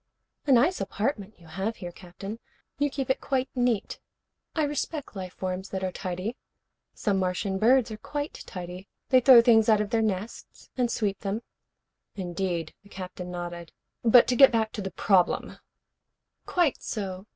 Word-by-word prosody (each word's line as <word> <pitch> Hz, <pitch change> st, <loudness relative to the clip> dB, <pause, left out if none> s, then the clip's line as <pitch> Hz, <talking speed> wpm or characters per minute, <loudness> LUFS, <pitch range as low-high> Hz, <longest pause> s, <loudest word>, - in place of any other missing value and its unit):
"A -, -, +3 dB
nice 280 Hz, +9 st, +4 dB
apartment 205 Hz, 0 st, -3 dB
you 170 Hz, -, -17 dB
have 190 Hz, +8 st, -3 dB
here, 175 Hz, -4 st, -7 dB
Captain. 195 Hz, +5 st, -9 dB, 0.4 s
You 290 Hz, 0 st, +2 dB
keep 270 Hz, -1 st, -2 dB
it -, -, -1 dB
quite 265 Hz, -1 st, -1 dB
neat. 245 Hz, -5 st, 0 dB, 0.6 s
I 315 Hz, -, +2 dB
respect 290 Hz, -2 st, -3 dB
life 185 Hz, -2 st, -6 dB
forms 185 Hz, +1 st, -4 dB
that 190 Hz, -1 st, -4 dB
are 185 Hz, -, -1 dB
tidy. 185 Hz, +7 st, -4 dB, 0.6 s
Some 200 Hz, -2 st, 0 dB
Martian 190 Hz, +1 st, -1 dB
birds 245 Hz, +1 st, +4 dB
are 215 Hz, -, -5 dB
quite 290 Hz, +6 st, -4 dB
tidy. 180 Hz, +1 st, -7 dB, 0.2 s
They 255 Hz, -, +6 dB
throw 250 Hz, -2 st, +8 dB
things 225 Hz, -2 st, +5 dB
out 215 Hz, -1 st, +5 dB
of 210 Hz, -1 st, -2 dB
their 230 Hz, -, +2 dB
nests 210 Hz, 0 st, -4 dB
and 250 Hz, -2 st, +1 dB
sweep 200 Hz, -3 st, -1 dB
them 205 Hz, +3 st, -3 dB, 0.4 s
" -, -, -57 dB, 0.3 s
"Indeed." 175 Hz, -3 st, -3 dB
The 200 Hz, -, -20 dB
Captain 180 Hz, -2 st, -7 dB
nodded. 175 Hz, -1 st, -6 dB, 0.3 s
"But 235 Hz, +1 st, +7 dB
to 250 Hz, -, +2 dB
get 270 Hz, +1 st, +8 dB
back 220 Hz, -2 st, +1 dB
to 210 Hz, -, -5 dB
the 190 Hz, -, -3 dB
problem 185 Hz, 0 st, +1 dB, 0.4 s
" -, -, -55 dB
"Quite 345 Hz, -6 st, +1 dB
so. 195 Hz, -2 st, -5 dB
205 Hz, 175 wpm, -27 LUFS, 185-245 Hz, 0.6 s, throw